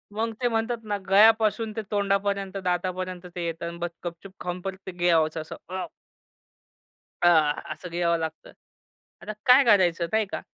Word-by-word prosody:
मग 225 +1 -1
ते 245 - +3
म्हणतात 225 0 -1
ना 205 -1 -1
गळ्यापासून 220 +2 +4
ते 220 - -2
तोंडापर्यंत 200 -1 0
दातापर्यंत 185 0 -2
ते 175 -1 -3
येतं 165 0 -4
आणि 170 0 -7
बस्स 170 0 -5
गपचूप 175 +3 -7
खाऊन 180 0 -4
परत 190 0 -5
ते - - -3
गिळायचं 165 -3 +2
असं. 155 - -8
अ 185 0 -4 1.3
अ, 175 - +5 0.5
असं 180 - -10
गिळावं 170 0 +1
लागतं. 160 0 -6 0.7
आता - - -5
काय 260 +2 +7
करायचं, 180 -6 +4
नाही 220 0 +2
का? - - -3
185 Hz, 160 wpm, -26 LUFS, 175-215 Hz, 1.3 s, काय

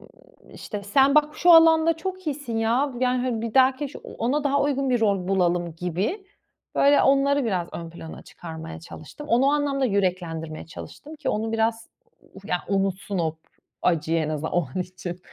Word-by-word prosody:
ımm, - - -22
işte, 205 -2 -7
sen 270 +7 +3
bak, 300 0 +3
şu 355 - +4
alanda 325 0 +6
çok 370 +2 -6
iyisin, 280 -6 -3
ya. 240 +5 +1
Yani, 250 -1 +1
hani, 240 -3 -1
bir 230 -2 -4
dahaki 265 +2 +4
iş 280 - -7
ona 280 +6 -2
daha 280 0 +2
uygun 275 -2 0
bir 245 - +2
rol 195 -4 +1
bulalım 175 -3 +1
gibi. 185 - -3 0.5
Böyle, 285 +1 +5
onları 275 0 +3
biraz 180 -6 -1
ön 165 -1 -7
plana 165 -1 -10
çıkarmaya 165 0 -9
çalıştım. 170 - -11
Onu 245 +3 +3
o - - +4
anlamda 285 -2 0
yüreklendirmeye 175 -7 -2
çalıştım 290 - -10
ki 300 - -4
onu 220 +1 -1
biraz 225 0 0 0.5
u - - -11
ya 180 -4 0
unutsun 195 0 -1
o 160 -2 0
p 160 - -29 0.4
acıyı, 165 -1 +1
en 155 -1 -1
azından 155 0 -3
o 175 -5 +1
an 185 - -1
için. 180 -1 -8
225 Hz, 185 wpm, -24 LUFS, 175-280 Hz, 0.5 s, alanda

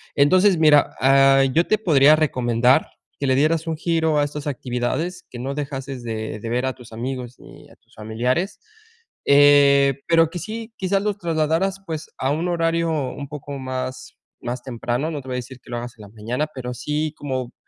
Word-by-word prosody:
Entonces, 185 +7 +4
mira, 150 -2 +5
ah, 135 0 +5
yo 170 +2 +4
te 215 - +3
podría 155 -7 +5
recomendar 125 -3 +2 0.3
que 140 - -1
le 130 - +3
dieras 155 +4 +1
un 160 -1 -2
giro 160 -2 +1
a - - +3
estas 145 0 -5
actividades, 130 +6 -3
que 120 - -9
no 135 +3 -3
dejases 135 -3 -5
de 110 -2 -5
de 115 - -6
ver 125 +2 0
a 130 - -1
tus 120 -3 -15
amigos, 125 +1 -5
ni - - -15
a - - -18
tus - - -32
familiares, 120 - -2 0.7
eh, 140 -1 +5
pero 165 -1 +4
que 175 - -6
sí, 225 +3 -7
quizás 195 +1 0
los 210 -1 -1
trasladaras, 170 +3 0
pues, 160 -2 -5
a 130 - -1
un 160 +4 -1
horario 165 -1 0
un 140 -2 -3
poco 145 -1 -8
más, 130 0 -6 0.2
más 125 +1 -5
temprano. 125 +4 -3
No 150 -3 -4
te 130 - -15
voy 130 - -3
a - - -1
decir 130 +1 -12
que - - -19
lo 120 - -2
hagas 120 0 -6
en - - -14
la 100 - -12
mañana, 115 +7 -3
pero 125 -2 -5
sí 150 +5 -3
como 130 -4 -4
140 Hz, 195 wpm, -22 LUFS, 125-160 Hz, 0.7 s, mira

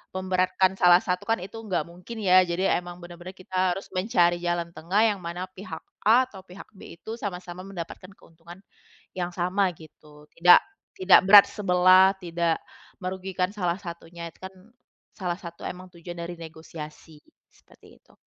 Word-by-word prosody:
memberatkan 185 0 +1
salah 180 +3 +6
satu, 180 -1 -2
kan 225 -5 0
itu 215 +4 -9
nggak 210 -5 -2
mungkin 180 +6 -10
ya. 185 0 +6
Jadi 175 +3 0
emang 175 0 -3
benar-benar 175 +2 -10
kita 185 -1 -1
harus 195 - -9
mencari 180 -3 +2
jalan 175 -1 -2
tengah 190 +7 0
yang 210 -4 +1
mana 175 +1 -5
pihak 185 -4 -9 0.2
A 240 +4 +6
atau 195 - -11
pihak 185 +4 -13
B 190 -4 -13
itu 220 +7 -8
sama-sama 180 -3 -6
mendapatkan 185 -1 -8
keuntungan 170 +4 -16 0.5
yang 175 -1 -3
sama 180 +2 0
gitu. 150 -2 -17
Tidak, 175 +1 +6 0.4
tidak 185 0 +7
berat 200 +1 +9
sebelah, 185 -1 +5
tidak 170 -2 -1 0.4
merugikan 185 -1 -3
salah 180 -2 -1
satunya. 170 -2 -8
Itu 165 - -16
kan 190 0 -8 0.6
salah 180 -2 -3
satu 170 -2 -10
emang 185 +1 -7
tujuan 175 0 -9
dari 170 +1 -6
negosiasi, 160 -1 -11 0.2
seperti - - -21
itu. - - -26
180 Hz, 155 wpm, -26 LUFS, 170-190 Hz, 0.6 s, berat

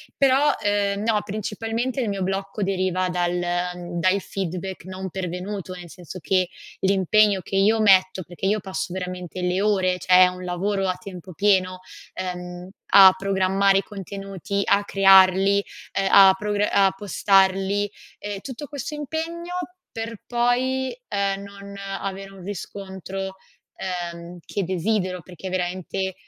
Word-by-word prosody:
Però, 275 +2 +4
ehm, 205 -1 +1
no, 220 -1 +2
principalmente 225 +5 -3
il 240 - 0
mio 195 -2 -2
blocco 195 +2 -3
deriva 185 -1 0
dal 180 0 0 0.6
da 185 - +3
il 200 - 0
feedback 185 -1 -5
non 190 0 -6
pervenuto, 185 +1 -5
nel 175 -1 -10
senso 180 +1 -10
che 185 +2 +1 0.3
l'impegno 195 +1 +3
che 195 - -6
io 215 +3 +3
metto, 185 -2 +4
perché 175 +2 -7
io 210 +1 +1
passo 190 -1 -4
veramente 180 -1 -5
le 180 +1 0
ore, 185 -3 +1
cioè 185 0 +6
è - - +6
un 180 0 -6
lavoro 195 +2 -1
a 185 - 0
tempo 185 -1 -10
pieno, 185 0 +2 0.3
ehm, 180 0 -6 0.2
a 190 -1 +9
programmare 195 0 +2
i - - -3
contenuti, 195 -1 -5
a 200 +1 +2
crearli, 195 0 +5 0.3
ehm, 195 0 +1
a 195 -1 +8
progra 210 0 -1
a 195 -1 +4
postarli, 195 +1 +2 0.3
e 205 -1 -5
tutto 275 +4 -7
questo 285 +1 -6
impegno 325 +4 -4 0.4
per 225 -1 -6
poi, 255 - 0
ehm, 195 0 -1
non 200 0 -10
avere 195 0 -5
un 190 -2 -13
riscontro, 190 -1 -6 0.4
ehm, 175 -1 -5
che 200 - -2
desidero 185 0 -1
perché 185 +1 -8
veramente 185 +1 -2
195 Hz, 140 wpm, -23 LUFS, 185-205 Hz, 0.6 s, a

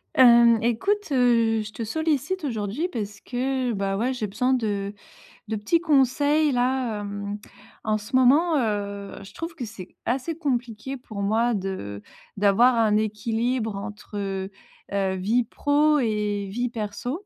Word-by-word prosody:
Hem, 235 -2 +7
écoute, 385 - 0
heu, 230 -4 +3
je 215 - -7
te 230 - -5
sollicite 315 - -1
aujourd'hui 230 - -2
parce 205 - -5
que, 255 0 -1
bah, 195 -1 -1
ouais, 240 +5 0
j'ai 245 -4 -3
besoin 250 +6 0
de 205 -5 -1 0.5
de 220 - -2
petits 230 +12 +1
conseils, 290 0 +3
là. 245 -3 0
Hem, 205 0 -5 0.5
en 215 0 +1
ce 220 +6 -5
moment, 295 +6 +5
heu, 200 -4 -2
je 195 - -13
trouve 330 +1 -5
que 260 -6 -5
c'est 205 -4 -9 0.2
assez 270 +7 -1
compliqué 255 -4 -3
pour 215 -5 -7
moi 225 +4 +2
de 185 - -4 0.4
d'avoir 210 +5 +5
un 220 -2 +3
équilibre 225 +1 -1
entre, 200 -1 -5 0.4
heu, 195 -1 0
vie 215 +7 +1
pro 295 +4 +2
et 210 -4 -1
vie 245 +4 -1
perso. 230 - -4
230 Hz, 145 wpm, -25 LUFS, 205-260 Hz, 0.5 s, Hem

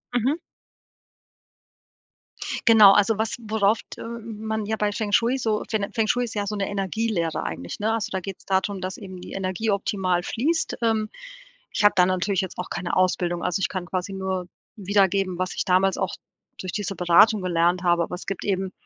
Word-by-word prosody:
Mhm. 260 +7 +2 2.3
Genau, 215 -3 +9
also, 205 +1 +3
was 220 +1 -1
worauf 220 -1 +1
t - - -8
äh, - - -5
man 220 -2 -4
ja 220 - -1
bei 210 -1 0
Feng-Shui 225 +5 +1
so 220 -4 0
Fen 205 -2 0
Feng-Shui 235 +2 +1
ist 230 - -8
ja 205 -1 -1
so 210 - -3
'ne 195 -1 -1
Energielehre 195 -3 -1
eigentlich, 85 +2 -5
ne? 220 +2 +1
Also, 225 -3 -2
da 190 - -1
geht's 190 0 -8
darum, 190 0 0
dass 185 0 -4
eben 185 -3 -9
die - - -9
Energie 190 +3 -2
optimal 190 -3 0
fließt. 310 - -1
Ähm, 220 -2 +1 0.6
ich 210 - +1
habe 205 - +7
da 180 - +6
natürlich 185 +1 0
jetzt 190 - -6
auch 180 - -5
keine 170 - -2
Ausbildung. 175 -1 +1
Also, 180 +2 -1
ich - - +1
kann 185 -2 -4
quasi 185 +2 -3
nur 190 -2 -3 0.3
wiedergeben, 195 -2 +1
was 185 - -2
ich - - -1
damals 190 +1 +2
auch - - -1 0.5
durch 185 -2 -5
diese 200 -2 -3
Beratung 180 +4 +5
gelernt 175 0 +1
habe, 175 -1 +3
aber 180 - -4
es - - -9
gibt 195 - -4
eben 190 -1 -1
195 Hz, 190 wpm, -24 LUFS, 185-220 Hz, 2.3 s, Genau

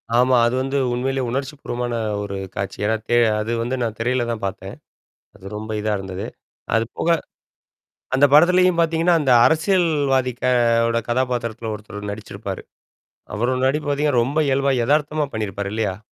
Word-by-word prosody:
ஆமா. 125 +1 +4
அது 125 - -1
வந்து 135 +1 -1 0.2
உண்மையிலேயே 130 +1 -1
உணர்ச்சிப்பூர்வமான 125 -3 -3 0.3
ஒரு 100 -1 -5 0.2
காட்சி. 100 0 -4
ஏன்னா 110 +1 +2
தெ 120 - +3 0.2
அது 110 +2 -3
வந்து 125 +3 -2
நான் 110 -2 -3
திரையில 125 +1 0
தான் 110 -3 -5
பாத்தேன். 95 - -6 0.6
அது 95 -1 -14
ரொம்ப 110 +1 -6
இதா 110 0 -1
இருந்தது. 95 0 -6 0.5
அது 115 0 +3
போக, - - -2 1.1
அந்த 140 +2 +5
படத்திலயும் 180 +2 +5
பாத்தீங்கன்னா, 165 +1 +2
அந்த 135 -3 +1
அரசியல்வதியோட 155 -7 +2
கே 125 - +2 0.4
ஓட 115 0 +1
கதாபாத்திரத்தில 120 -3 -1
ஒருத்தர் 105 -1 -8
நடிச்சிருப்பாரு. 105 +1 -7 0.7
அவரோட 125 +4 0
நடிப்பு 145 +2 -1
பாத்தீங்கன்னா, 145 -4 +2
ரொம்ப 145 +5 -1
இயல்பா 135 0 +2
எதார்த்தமா 150 +1 +1
பண்ணியிருப்பாரு, 100 -2 -3
இல்லையா? 105 -4 -1
125 Hz, 145 wpm, -21 LUFS, 110-145 Hz, 1.1 s, அந்த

